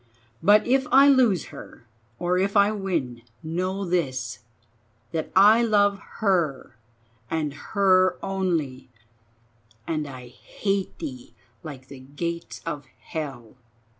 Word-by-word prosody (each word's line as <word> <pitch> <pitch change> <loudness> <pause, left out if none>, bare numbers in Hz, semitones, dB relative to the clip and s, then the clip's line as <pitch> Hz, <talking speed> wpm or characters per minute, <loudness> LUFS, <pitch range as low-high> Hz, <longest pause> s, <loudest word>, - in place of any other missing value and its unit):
But 205 +4 +5
if 265 +1 +2
I 275 +2 +7
lose 240 - +3
her 115 - -12 0.3
or 180 +4 0
if 200 +2 +1
I 200 +1 +5
win, 170 - -3 0.2
know 185 +5 -2
this, 130 -11 -2 0.7
that 160 -1 -3
I 210 +4 +7
love 205 -3 +3 0.2
her 160 - 0 0.5
and 155 -3 -2
her 185 +3 +2
only, 160 -10 -2 1.0
and 155 -2 -2
I 130 -3 -10
hate 195 - -3
thee 130 -7 -8 0.3
like 135 -5 -9
the 135 -1 -11
gates 170 +6 -5
of 150 -4 -5
hell. 130 -7 -7
170 Hz, 115 wpm, -25 LUFS, 140-195 Hz, 1.0 s, I